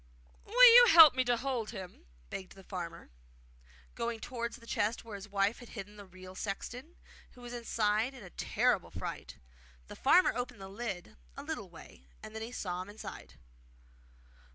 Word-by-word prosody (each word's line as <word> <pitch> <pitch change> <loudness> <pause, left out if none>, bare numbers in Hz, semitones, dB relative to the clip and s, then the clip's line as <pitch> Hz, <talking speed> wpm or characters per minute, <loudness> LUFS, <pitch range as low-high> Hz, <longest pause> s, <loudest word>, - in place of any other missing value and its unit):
'Will 485 +2 +8
you 485 0 +9
help 320 -4 +10
me 255 0 +1
to 245 -1 +2
hold 245 -3 -3
him?' 180 - -9 0.2
begged 190 -1 -7
the 195 - -14
farmer, 170 - -7 0.8
going 235 -1 -3
towards 235 0 -5
the 230 - -17
chest 230 0 -1
where 225 - -9
his 200 +1 -8
wife 200 +2 0
had 240 - -12
hidden 205 -1 -9
the 205 -1 -12
real 185 0 -12
sexton, 240 - -6 0.4
who 250 - -16
was 240 0 -9
sitting 240 -1 -5
inside 220 +3 0
in 245 - -11
a 180 - -12
terrible - - 0
fright. - - -7 0.5
The - - -8
farmer 350 +7 +4
opened 245 -2 -4
the 195 0 -9
lid 195 - -6 0.2
a - - -6
little - - -5
way, 65 +2 -15 0.2
and 215 - -9 0.2
saw 180 -2 -3
him 185 - -9
inside. 210 +1 -10
220 Hz, 175 wpm, -32 LUFS, 195-245 Hz, 0.8 s, help